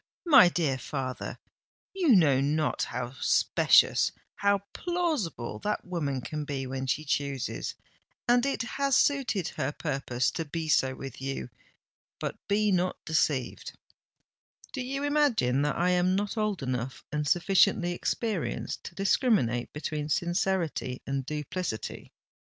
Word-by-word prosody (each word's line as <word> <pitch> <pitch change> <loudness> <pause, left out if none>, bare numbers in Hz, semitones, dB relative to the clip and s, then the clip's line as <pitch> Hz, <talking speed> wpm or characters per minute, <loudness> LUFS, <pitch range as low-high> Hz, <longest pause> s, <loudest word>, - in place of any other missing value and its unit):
my 270 - +8
dear 150 -7 0
father, 130 0 -4 0.6
you 375 -3 0
know 145 -7 +5
not 150 +2 0
how 125 +1 -4
specious—how 200 0 +3 0.2
plausible 305 - -2
that 210 - -2
woman 150 -8 -2
can 150 +4 -4
be 140 -2 -3
when 130 0 -4
she 155 +4 -1
chooses; 140 -2 -2 0.5
and 245 0 +4
it 275 -3 0
has 275 +2 0
suited 255 - +2
her 135 - -2
purpose 130 -4 -1
to 165 - -3
be 160 +1 -4
so 130 -3 +2
with 135 0 -8
you. 135 -2 -4 0.7
But - - -3
be 210 +1 +2
not 180 0 +1
deceived——" 150 -5 0 1.0
"Do 270 - -3
you 275 +3 -3
imagine 280 - +2
that 150 -1 0
I 180 +2 +2
am 180 +1 +2
not 205 +2 -1
old 215 -7 -1
enough 130 0 -3
and 150 0 -1
sufficiently 180 +1 +3
experienced 200 +1 -2
to - - -8
discriminate 195 - +1
between 150 0 -4
sincerity 175 -6 -1
and 135 -1 -3
duplicity?" 150 -4 -4
160 Hz, 130 wpm, -28 LUFS, 135-205 Hz, 1.0 s, my